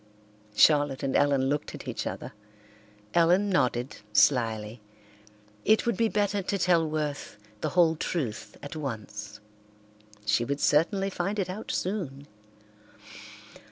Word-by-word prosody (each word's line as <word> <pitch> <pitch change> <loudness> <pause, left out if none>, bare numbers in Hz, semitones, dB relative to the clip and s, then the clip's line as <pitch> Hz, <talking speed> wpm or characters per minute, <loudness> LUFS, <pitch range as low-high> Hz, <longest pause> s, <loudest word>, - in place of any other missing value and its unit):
Charlotte 145 -1 +4
and 135 - -1
Ellen 140 -2 +3
looked 145 +2 -2
at - - -10
each - - -3
other. - - -6 0.8
Ellen 180 +4 +4
nodded 125 -6 0 0.2
slyly. 110 -3 +2 0.8
It 220 - +3
would 235 -3 +1
be 225 +3 +2
better 205 -1 0
to 200 +2 -2
tell 170 -3 +2
Worth 150 -6 -3 0.2
the - - -1
whole 170 -3 +4
truth 145 -8 -4
at 145 - -7
once. 105 -7 -6 0.9
She 105 +3 +2
would 140 +4 -2
certainly 195 +8 +2
find 195 +4 -2
it 185 -3 -1
out 210 +4 -7
soon. 165 -8 -3
150 Hz, 125 wpm, -28 LUFS, 130-185 Hz, 0.9 s, Charlotte